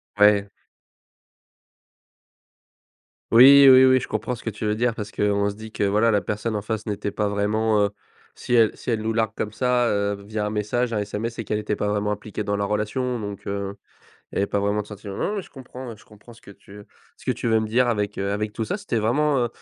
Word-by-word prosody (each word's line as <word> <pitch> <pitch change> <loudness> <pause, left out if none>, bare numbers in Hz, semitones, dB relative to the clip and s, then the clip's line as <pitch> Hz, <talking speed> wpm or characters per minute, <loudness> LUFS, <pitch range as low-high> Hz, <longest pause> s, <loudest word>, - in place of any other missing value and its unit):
Ouais. 105 -1 +4 2.8
Oui, 135 +4 +9
oui, 130 0 +8
oui, 130 0 +5
je - - -7
comprends 125 - -3
ce - - -13
que 115 - -2
tu 105 0 -8
veux 105 0 +1
dire. 115 0 0
Parce 105 -2 -6
qu'on 100 0 +1
se 100 - -7
dit 110 0 -11
que, - - -2
voilà, 105 +3 +3
la 105 -2 +2
personne 105 +2 -3
en 105 - -2
face 110 0 -4
n'était 105 -1 -3
pas 105 0 -1
vraiment, 105 +1 +1
heu, 100 - +1 0.5
si - - -4
elle 115 -3 +5
si - - -7
elle 115 -2 0
nous 110 +1 -1
largue 110 -1 0
comme 105 - -3
ça, 125 +1 +1
heu, 100 0 0
via 105 0 -3
un - - -1
message, 115 +3 -1
un 105 - 0
SMS, 105 +3 -3
c'est 115 - -5
qu'elle 105 0 -2
était 105 0 -2
pas 105 - -2
vraiment 105 0 -1
impliquée 105 0 -6
dans 100 - -1
la 100 - -1
relation 110 +4 -2
donc, 100 -2 -7
heu, 100 0 -4 0.6
elle - - -4
avait 100 - +1
pas 100 - -1
vraiment 100 +1 0
de - - -16
sentiment. 100 -1 -8
Non, 210 - -2
mais 200 - -3
je - - -17
comprends 125 -3 -9
je - - -20
comprends 105 +2 -17
ce - - -19
que 100 - -14
tu 100 +1 -14 0.3
ce - - -18
que - - +1
tu - - -3
veux 110 0 +3
me 110 - -1
dire 120 +3 +2
avec, 105 -3 -1
heu, 100 0 -2
avec 105 +1 -2
tout 110 - -3
ça. 155 - -2
C'était 200 - -3
vraiment, 140 +7 +1
heu, - - -5
105 Hz, 240 wpm, -23 LUFS, 105-115 Hz, 2.8 s, Oui